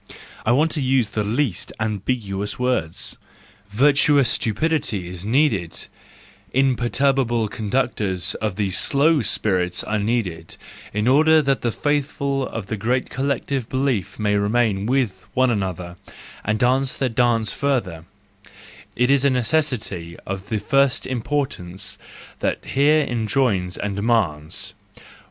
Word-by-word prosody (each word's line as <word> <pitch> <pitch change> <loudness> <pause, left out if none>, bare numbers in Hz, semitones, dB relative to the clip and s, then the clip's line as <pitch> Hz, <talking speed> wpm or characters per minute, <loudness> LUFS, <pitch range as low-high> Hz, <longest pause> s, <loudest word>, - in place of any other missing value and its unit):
I - - +5
want 150 +6 +3
to 150 - -2
use 130 -4 +2
the 105 - -1
least 115 - -1
ambiguous 105 -1 -2
WO 125 0 +2
rd,— 80 - -5 0.5
virtuous 140 +3 +4
stupidity 110 - 0
is 90 0 -8
needed, 110 - +1 0.7
imperturbable 130 -2 +2
conductors 105 -4 -1
of 105 -4 -1
the 100 -2 -1
slow 145 - +3
spirits 90 -5 0
are 105 0 -1
needed, 100 -7 -2 0.3
in 105 +3 -1
order 155 +4 +5
that 135 -1 +1
the 120 - 0
faithful 140 -1 -1
of 115 -4 -5
the 105 +2 -4
great 125 +5 -1
collective 135 -2 -2
belief 125 -8 -1
may 105 -1 +1
remain 105 -1 +1
with 120 -8 0
one 130 -1 +3
another 90 -4 -3 0.5
and 110 +1 0
dance 130 +3 +1
their 135 - +1
dance 115 -2 +1
further: 115 - -1 0.9
it 125 +2 +2
is 140 -1 +4
a 140 - +5
necessity 125 - -1
of 95 +1 -5
the 110 - 0
first 135 +4 +2
importance 110 -8 -3 0.4
that - - -2
here 150 +3 +3
enjoins 110 -6 0
and 100 -1 -3
demands. 95 -9 0
115 Hz, 130 wpm, -22 LUFS, 100-135 Hz, 0.9 s, I